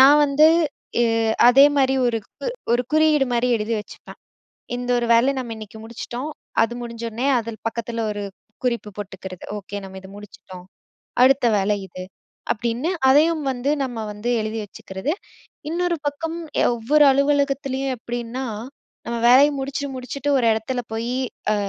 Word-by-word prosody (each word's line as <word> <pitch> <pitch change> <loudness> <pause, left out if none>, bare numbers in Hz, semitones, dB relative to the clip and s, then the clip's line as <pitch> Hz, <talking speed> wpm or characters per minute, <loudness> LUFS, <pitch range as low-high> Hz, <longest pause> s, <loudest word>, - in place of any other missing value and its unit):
நான் 280 +3 +8
வந்து 290 +2 +5 0.6
எ - - +4 0.4
அதே 270 +3 +8
மாரி 265 -1 +3
ஒரு 230 -1 +1
கு - - -9 0.3
ஒரு 245 +1 +3
குறியீடு 310 -3 +4
மாரி 240 +1 +1
எழுதி 220 +2 -2
வச்சுப்பேன். 210 - -13 0.6
இந்த 245 0 -5
ஒரு 240 - -1
வேலை 245 +4 +4
நம்ம 235 -3 -5
இன்னைக்கு 215 0 -10
முடிச்சுட்டோம். 240 +4 -6 0.3
அது 230 - -2
முடிஞ்ச 235 -1 -7
உடனே, 240 +5 -2
அதில 230 -1 -6
பக்கத்தில 230 0 -3
ஒரு 205 0 -4 0.4
குறிப்பு 235 -4 -1
போட்டுக்கறது. 190 -2 -8
"ஓகே 205 0 -7
நம்ம 190 0 -9
இத 190 - -12
முடிச்சுட்டோம். 185 -3 -12 0.6
அடுத்த 265 0 +4
வேலை 205 +1 +1
இது" 185 0 -8 0.5
அப்டின்னு 235 +7 -2 0.2
அதையும் 310 +3 +4
வந்து 260 +2 -2
நம்ம 245 -3 -4 0.2
வந்து 210 +4 -4
எழுதி 215 +1 -3
வச்சுக்கிறது, 195 +6 -5 0.6
இன்னொரு 345 0 0
பக்கம் 325 +3 -3 0.4
ஒவ்வொரு 290 +6 +4
அலுவலகத்திலேயும் 275 -1 +1
எப்படின்னா, 240 +2 -4 0.6
நம்ம 235 0 -2
வேலையை 275 +4 +7
முடிச்சுட்டு 280 +1 -3
முடிச்சுட்டு 255 +3 -4
ஒரு 250 - +1
எடத்துல 220 +4 -3
போயி 230 +2 -2 0.4
அ - - +1
245 Hz, 145 wpm, -22 LUFS, 225-275 Hz, 0.6 s, நான்